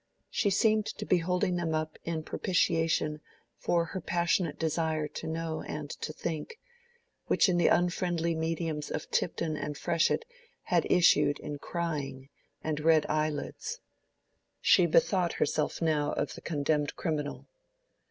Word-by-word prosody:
She 205 - +2
seemed 215 +2 +3
to 215 -1 -5
be 180 - +3
holding 180 +1 0
them 165 -2 -1
up 155 0 -3
in 160 -2 -2
propitiation 165 -4 +1 0.3
for 170 -1 +1
her 185 +2 -5
passionate 170 -1 0
desire 160 -1 0
to - - -6
know 160 0 -3
and 150 -1 -5
to - - -5
think, 165 - -5 0.7
which - - +4
in 180 -2 +2
the 170 - +4
unfriendly 175 -1 +1
mediums 160 -1 -2
of - - -5
Tipton 165 -2 0
and 150 -1 -4
Freshitt 170 - +1 0.4
had - - +1
issued 170 -4 +5
in 145 -1 -6
crying 140 -6 -4 0.3
and 155 -1 -1
red 160 0 +4
eyelids. 155 - -2 0.8
She - - +5
bethought 190 - +3
herself - - 0
now 150 -2 +1
of - - -2
the - - -10
condemned 150 -1 0
criminal. 150 -4 -3
165 Hz, 140 wpm, -30 LUFS, 155-175 Hz, 0.8 s, issued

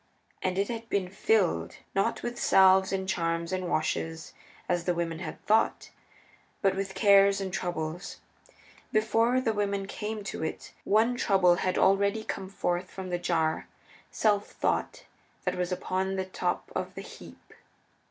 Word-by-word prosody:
And 185 0 -1
it 200 +1 +1
had 230 -1 -6
been 190 -2 0
filled, 185 - +1 0.2
not 195 +4 0
with 240 0 -4
salves 190 0 +5
and 190 -1 -2
charms 170 -1 -1
and 185 -1 -2
washes, 160 0 -2 0.3
as 175 -1 0
the 180 - +1
women 165 -1 -2
had - - -6
thought, 220 +1 +2 0.7
but 195 -1 +3
with 195 0 -3
Cares 200 -1 +5
and 190 -2 -4
Troubles. 175 0 -4 0.7
Before 225 +3 +3
the 230 -3 0
women 200 -1 -1
came 210 +2 -5
to 195 - -5
it 160 - -5
one 225 +4 +3
Trouble 190 -7 +4
had 185 +1 0
already 200 +3 +3
come 190 -3 -5
forth 180 -2 -2
from 190 -1 -7
the 175 - -1
jar 160 -2 0 0.4
Self 205 -2 +1
thought - - -2 0.4
that - - +1
was 180 0 -2
upon 190 +1 -1
the 190 -1 -2
top 185 - -3
of - - -3
the - - -5
heap. - - -13
190 Hz, 155 wpm, -28 LUFS, 175-205 Hz, 0.7 s, salves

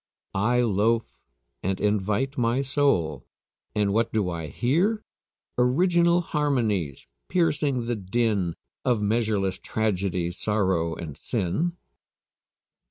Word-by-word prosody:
"I 120 +6 +2
loafe 115 +1 +1 0.5
and 95 0 -1
invite 105 +6 0
my 120 +2 +1
soul." 130 - +1 0.5
And 105 -2 +2
what 115 +2 +1
do 100 -5 0
I 85 -2 -4
hear? 170 - +1 0.6
Original 170 +7 +4
harmonies 115 - 0 0.2
piercing 145 -7 +1
the 120 -1 -1
din 100 -3 0 0.3
Of 120 -3 +2
measureless 105 -3 0
tragedy, 95 -5 -1
sorrow, 95 -4 0
and 75 -4 -7
sin. 120 - -1
110 Hz, 100 wpm, -26 LUFS, 95-130 Hz, 0.6 s, Original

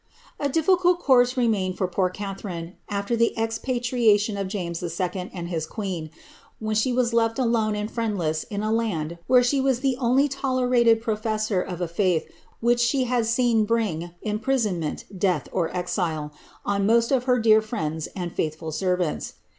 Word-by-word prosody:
A 285 - 0
difficult 355 +4 +3
course 255 -5 +3
remained 200 -7 +1
for 185 - 0
poor 185 +1 0
Catharine 190 -3 -6 0.2
afler 200 +3 -1
the 230 0 +2
expatriatioi 225 -2 +1
of 195 -1 -2
James 175 -4 -4
II. 180 +2 -3
and 175 -2 -6
his 160 -3 -2
queen, 185 -7 -4 0.5
when 215 0 -2
slie 240 +3 +1
was 245 -2 +1
left 225 -1 +2
alone 230 -4 +1
and 210 0 -2
friendless 185 -9 -1
io 205 - -4
t 210 - -1
land 195 -8 -1
where 250 -1 +6
she 270 +2 +2
wastlic 265 0 +1
only 260 +3 +3
tolerated 250 -4 +2
professor 215 -3 0
of 180 -1 -5
a 175 - 0
faith 170 -1 0 0.3
which 240 +1 +3
she 255 +2 +2
had 245 -2 0
seen 235 -1 +3
bring 210 -7 -1
imprisonment, 210 - -1
death, 185 -1 0
or 170 -3 0
exile, 175 -4 -2 0.3
on 200 0 +1
most 230 +2 +3
of 255 -2 +2
her 250 -1 +3
dearest 220 -1 +4
frieDdi 160 -9 -3
and 175 -3 -5
faitliful 160 0 -3
servants. 180 -2 -1
215 Hz, 160 wpm, -24 LUFS, 180-240 Hz, 0.5 s, where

